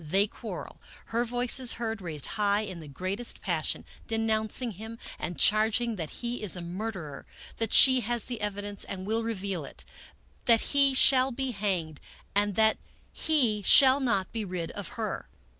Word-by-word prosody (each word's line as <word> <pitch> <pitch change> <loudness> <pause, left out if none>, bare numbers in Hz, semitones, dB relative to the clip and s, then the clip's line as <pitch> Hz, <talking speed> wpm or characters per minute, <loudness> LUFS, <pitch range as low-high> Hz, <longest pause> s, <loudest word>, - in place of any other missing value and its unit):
They 190 +6 +2
quarrel. 210 - -9 0.3
Her 235 +1 +2
voice 245 +1 0
is 255 -2 +2
heard, 225 -2 -4
raised 155 -6 -3
high 205 0 0
in 190 -5 -7
the 155 - -10
greatest 185 - -4
passion, 165 -4 -3 0.2
denouncing 225 +1 -1
him, 220 +4 -9 0.2
and 175 - -5
charging 220 +2 +3
that 160 -4 -5
he 240 0 -5
is 210 -4 -2
a 180 - -6
mur 190 +7 -4
derer, 155 -8 -9 0.3
that 225 -2 -2
she 260 -1 +8
has 240 -1 -2
the 240 -3 -6
evidence 205 0 -4
and 185 -1 -6
will 220 +3 -1
reveal 200 -6 -4
it, - - -10 0.6
that 230 -2 +5
he 275 -1 +4
shall 260 0 +6
be 265 +1 -3
hanged, 185 -8 -2 0.3
and 205 -1 +2
that 220 +1 +3 0.3
he 250 -10 +2
shall 265 +6 +7
not 225 -8 0
be 225 -1 -4
rid 180 -4 -5
of 205 -4 -6
her. 220 -3 -4
215 Hz, 175 wpm, -28 LUFS, 190-235 Hz, 0.6 s, she